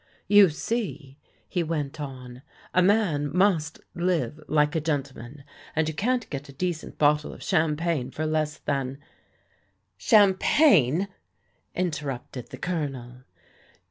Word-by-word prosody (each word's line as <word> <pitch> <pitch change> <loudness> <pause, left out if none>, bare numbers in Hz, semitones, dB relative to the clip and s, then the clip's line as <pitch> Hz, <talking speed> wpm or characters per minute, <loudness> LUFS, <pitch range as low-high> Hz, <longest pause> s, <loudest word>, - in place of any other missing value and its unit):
"You 205 -3 +7
see," 155 - -4 0.3
he 180 - -1
went 155 -2 -3
on, 130 -3 -8 0.3
"a 180 - +4
man 180 -7 +2
must 175 -4 +1
live 170 -5 -1
like 150 +1 +2
a 160 - +1
gentleman, 140 -3 -4 0.3
and 160 -1 +1
you 160 - -2
can't 240 +8 0
get 140 0 -5
a - - -11
decent 170 +2 -4
bottle 150 0 +2
of - - -11
champagne 155 -3 0
for 155 +4 -4
less 155 -1 -1
than 135 -2 -2 0.4
" - - -39
" - - -48
Champagne! 195 - +5 0.4
" - - -43
interrupted 140 -6 -5
the - - -9
Colonel. 135 -7 -4
155 Hz, 135 wpm, -26 LUFS, 140-180 Hz, 0.4 s, You